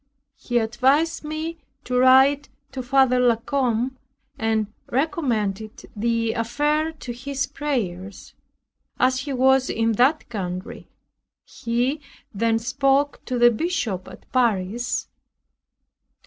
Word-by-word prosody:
He 245 - -1
advised 265 +9 +2
me 315 +2 -5 0.2
to 250 - -3
write 265 +3 +5 0.2
to 265 - -5
Father 255 0 +3
La 245 -2 +4
Combe, 250 0 -1 0.4
and 220 -1 0 0.2
recommend 225 - -1
the 230 +1 0
affair 295 +7 0
to 260 -6 -7
his 275 +3 -3
prayers, 200 -10 -4 0.7
as 255 0 +3
he 280 +1 -4
was 265 +1 +3
in 225 0 +1
that 255 +8 +2
country. 185 -5 -6 0.6
He 245 +6 -2 0.3
then 225 +2 +1
spoke 275 +4 +1
to 255 - -2
the 240 0 +6
Bishop 230 - -2
at - - -13
Paris. 235 -2 0
250 Hz, 110 wpm, -23 LUFS, 225-275 Hz, 0.7 s, the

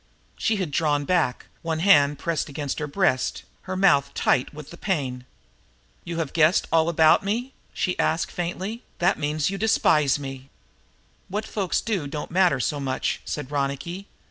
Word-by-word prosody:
She 220 - 0
had 185 -7 -2
drawn 145 -1 +1
back, 165 -7 0 0.2
one 165 -1 -2
hand 145 -5 +5
pressed 165 -3 -2
against 145 -1 -4
her 150 - -3
breast, 145 -5 0 0.3
her 185 - -2
mouth 165 -8 +4
tight 125 - +1
with 150 -1 -11
the - - -9
pain. 135 -11 -2 0.8
"You 170 -1 -5
have 160 -4 -3
guessed 160 +1 +3
all 160 -1 +4
that - - 0
about 160 0 +5
me?" 235 +6 -2 0.2
she 180 - -2
asked 160 +1 0
faintly. 185 +6 -4 0.2
"That 175 +3 +2
means 150 +2 0
you 195 - -4
despise 150 -10 +3
me!" 135 -1 -8 0.8
"What 210 +3 -3
folks 195 -4 -1
do 195 -10 -2
don't 150 +2 -6
matter 180 -6 +3
so 145 +4 -1
much," 135 -2 -2
said 145 -2 -5
Ronicky. 145 +7 -3
160 Hz, 170 wpm, -24 LUFS, 145-185 Hz, 0.8 s, hand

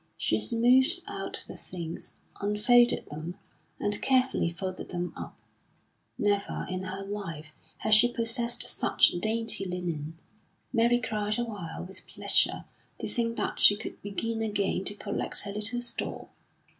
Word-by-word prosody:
She 110 - +1
smoothed 250 - +4
out - - -5
the - - -8
things, 170 -2 -6 0.2
unfolded 240 +4 +4
them, 160 +5 -6 0.4
and 205 0 0
carefully 260 -8 +2
folded 185 +2 -5
them 175 -1 -3
up. - - -8 0.8
Never 205 -1 0
in 185 0 -3
her 190 +1 -5
life 175 -7 -6 0.3
had 215 - +2
she 235 +3 +7
possessed 235 +1 +1
such - - +3
dainty 225 +1 0
linen. 170 -4 -4 0.6
Mary 240 0 +4
cried 215 -2 -1
a 240 - 0
while 180 -8 -6
with 190 +1 -9
pleasure - - +2 0.3
to - - -3
think 230 -1 -1
that - - -2
she 205 - +8
could 205 - -7
begin 225 +3 -3
again 205 -3 -1
to 205 - -1
collect 205 - -1
her 200 - -5
little 225 +4 -1
store. 240 - -2
205 Hz, 145 wpm, -28 LUFS, 185-230 Hz, 0.8 s, she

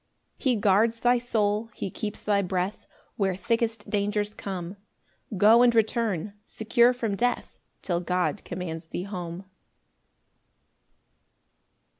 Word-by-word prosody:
6 - - -15
He 260 -4 +3
guards 215 +3 +3
thy 245 0 +4
soul, 220 -2 0
he 190 - -4
keeps 210 +2 -5
thy 205 -1 +2
breath 185 +1 -2 0.3
Where 195 -4 +1
thickest 230 +4 -1
dangers 205 0 -1
come; 190 -2 -6 0.6
Go 220 +5 +7
and 240 -1 +5
return, 220 -4 +1
secure 235 +3 +3
from 230 -5 -2
death, 245 +4 -1 0.2
Till 175 -2 0
God 180 +3 -1
commands 170 -2 -6
thee 175 - -4
home. 180 -2 -6
205 Hz, 120 wpm, -26 LUFS, 185-230 Hz, 0.6 s, Go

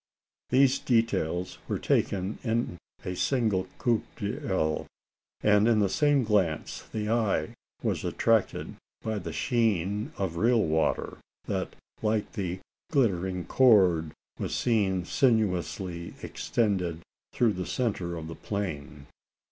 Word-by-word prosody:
These 135 +1 +4
details 105 -7 0
were - - -1
taken 95 +2 0
in 115 -7 -1 0.2
at - - -20
a - - -4
single 110 -6 +1
coup 120 -3 +2
d'oeil; 95 -7 -1 0.6
and 105 +1 +5
in 115 -2 +4
the 100 -2 +3
same 145 +4 +3
glance 100 -8 0
the 105 -1 -2
eye 110 -2 +1 0.3
was - - -1
attracted 115 -3 +1 0.3
by 110 -2 -1
the 85 -3 -5
sheen 105 - 0
of 90 -4 -2
real 115 +2 +4
water, 80 0 0 0.3
that, - - -3 0.3
like 110 -1 0
a 90 -1 -2 0.3
glittering 95 - +1
cord, 95 -11 +4 0.3
was - - -2
seen 100 -7 +1
sinuously 90 - 0
extended 90 -7 -1 0.3
through 115 -4 +2
the 90 -1 -4
centre 95 -8 -1
of 80 -1 -6
the 80 - -6
plain. 75 -8 -5
100 Hz, 125 wpm, -28 LUFS, 90-115 Hz, 0.6 s, and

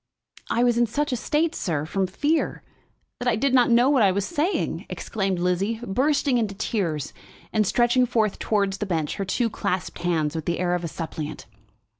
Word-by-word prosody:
"I 235 - +2
was 240 -1 +3
in 240 - +3
such 290 +6 -1
a - - +1
state, 305 +7 0
sir, 155 -5 -2
from 190 +3 -1
fear, 295 - 0 0.6
that 245 - -3
I 240 - +3
did 260 +4 +1
not 250 -2 +5
know 240 +2 +5
what 275 -3 +4
I 195 -3 +5
was 195 +1 -1
saying," 340 - -1
exclaimed 195 -3 -2
Lizzie, 180 +5 0
bursting 265 +3 +2
into 210 -3 -2
tears 175 - -2 0.4
and 215 -2 +2
stretching 240 +3 +3
forth 220 -4 0
towards 200 -2 0
the 210 - -2
bench 160 -5 -1
her 195 - -2
two 230 +6 +1
clasped 195 -5 -3
hands 160 -4 0
with 160 - -3
the 170 - 0
air 175 -1 0
of 180 0 -1
a - - -2
suppliant. 160 -2 -6
210 Hz, 195 wpm, -24 LUFS, 180-245 Hz, 0.6 s, not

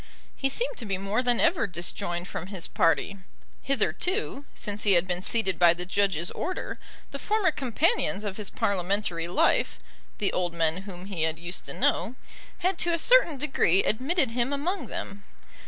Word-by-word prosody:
He 270 - 0
seemed - - -1
to - - -5
be 195 -2 -1
more 200 +5 0
than 245 -2 +2
ever 330 - +3
disjoined 175 0 -2
from 180 - -5
his 190 -4 -5
party. 180 +4 +1 0.4
Hitherto, 285 - -1
since 205 0 -5
he 205 - +4
had 175 +1 +3
been 180 -1 -1
seated 195 -2 0
by 170 -1 +6
the 180 +1 -4
Judge's 185 -3 0
order, 370 - -4 0.3
the 280 - -6
former 420 -1 +1
companions 270 - 0
of 200 -2 -4
his 210 -3 -4
Parliamentary 185 -3 -1
life, 175 - +2 0.4
the - - 0
old 175 -2 -1
men 165 0 +1
whom 180 -1 -8
he 195 -5 -4
had 160 0 0
used 175 +2 -5
to - - -4
know, 235 - +1 0.5
had 370 -1 +1
to 345 - +3
a 335 - +2
certain 405 - +5
degree 255 - +2
admitted 270 +4 +1
him 240 +3 0
among 295 - -2
them. 200 0 -6
205 Hz, 175 wpm, -27 LUFS, 180-280 Hz, 0.5 s, by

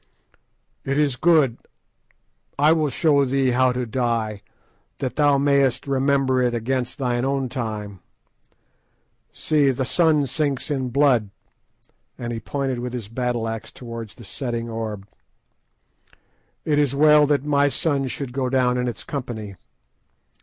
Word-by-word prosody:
"It 135 +1 -1
is 145 -4 +2
good. 150 -5 +3 1.0
I 150 +3 +5
will 155 -2 +2
show 140 +1 +3
thee 135 -1 +1
how 130 +1 +3
to 125 0 -2
die, 115 -3 -2 0.6
that 130 -2 -3
thou 145 -2 +4
mayest 140 -2 +2
remember 135 -1 +1
it 120 -1 +1
against 125 +2 -2
thine 125 -2 -1
own 135 -1 -1
time. 105 -6 -5 1.3
See, 150 -3 +1
the 130 0 -1
sun 150 +1 +3
sinks 140 +1 -2
in 130 -3 -1
blood," 125 -5 +3 0.9
and 120 -1 -4
he 115 - -4
pointed 135 0 -3
with 125 0 -5
his 115 -5 -5
battle 120 -1 -2
axe 115 0 -5
towards 115 -3 -8
the 120 - -13
setting 115 +1 -4
orb; 110 -3 -5 1.6
"it 150 -1 +2
is 140 -2 +1
well 150 0 +6
that 145 -1 +1
my 145 -1 +3
sun 140 -2 0
should 130 -1 -5
go 130 -1 -1
down 125 -1 +2
in 125 - -1
its 120 -4 -5
company. 110 -8 -6
130 Hz, 140 wpm, -22 LUFS, 120-140 Hz, 1.6 s, well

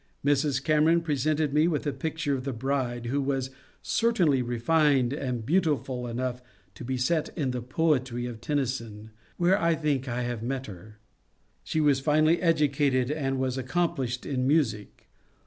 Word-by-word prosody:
Mrs. 140 -1 +1
Cameron 155 +3 +3
presented 150 -1 0
me 155 +2 +4
with 160 -3 -1
a 145 - -1
picture 160 -2 -2
of 130 -2 -2
the 135 -1 -3
bride, 120 -1 -2
who 140 +4 0
was 135 -1 -2 0.3
certainly 180 - +2
refined 130 +2 +2
and 125 -6 -3
beautiful 145 -6 0
enough 125 +1 -3 0.3
to 95 - -10
be 130 +1 -2
set 155 +5 0
in 140 -5 0
the 125 -1 -3
poetry 130 -2 0
of 120 -3 -7
Tennyson, 115 -7 -3 0.3
where 180 +3 +3
I 165 0 +3
think 145 -4 -1
I 125 0 -2
have 120 -2 -3
met 130 +2 -3
her. 105 +2 -11 0.7
She 155 - -2
was 145 -3 +3
finely 155 +4 +3
educated, 145 -6 +2
and 135 -3 -1
was 130 0 -1
accomplished 130 -3 -1
in 130 -2 -1
music. 135 -9 0
135 Hz, 160 wpm, -27 LUFS, 125-155 Hz, 0.7 s, me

